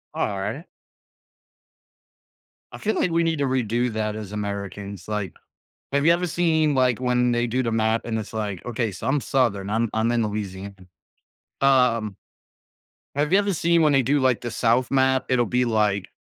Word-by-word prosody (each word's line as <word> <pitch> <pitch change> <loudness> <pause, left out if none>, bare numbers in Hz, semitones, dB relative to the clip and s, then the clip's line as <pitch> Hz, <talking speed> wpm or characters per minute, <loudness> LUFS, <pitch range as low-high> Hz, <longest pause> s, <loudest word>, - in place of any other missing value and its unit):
Alright. 105 - -3 2.1
I - - -8
feel 220 +1 -1
like 180 - +1
we 170 0 +2
need 165 -2 0
to 140 - +1
redo 125 -2 0
that 110 -1 -2
as 105 -2 -7
Americans. 100 -2 -5
Like, 105 -3 -3 0.6
have 140 +1 +1
you 165 - +6
ever 180 +1 -1
seen, 160 -3 +1
like, 125 -3 +2
when 125 -1 +1
they 120 0 +1
do 125 +3 0
the 115 - -1
map 110 0 +1
and 110 -1 -2
it's 110 - -8
like 105 -4 -4
okay, 115 -2 -2
so 90 - -6
I'm 140 +2 +2
Southern, 105 -8 0
I'm 115 +1 0
I'm 110 +1 +1
in 120 -1 +1
Louisiana. 100 -1 -5 0.9
Um 125 -7 +3 1.0
have 150 +3 0
you 195 - +6
ever 200 -1 0
seen 170 0 +2
when 150 -2 +4
they 135 - +4
do, 140 +4 +2
like, 130 -3 +2
the 120 -2 -4
South 120 +3 +1
map? 130 -1 +2
It'll 125 -2 +2
be 125 +1 +1
like, 105 -4 0
120 Hz, 180 wpm, -23 LUFS, 105-135 Hz, 2.1 s, you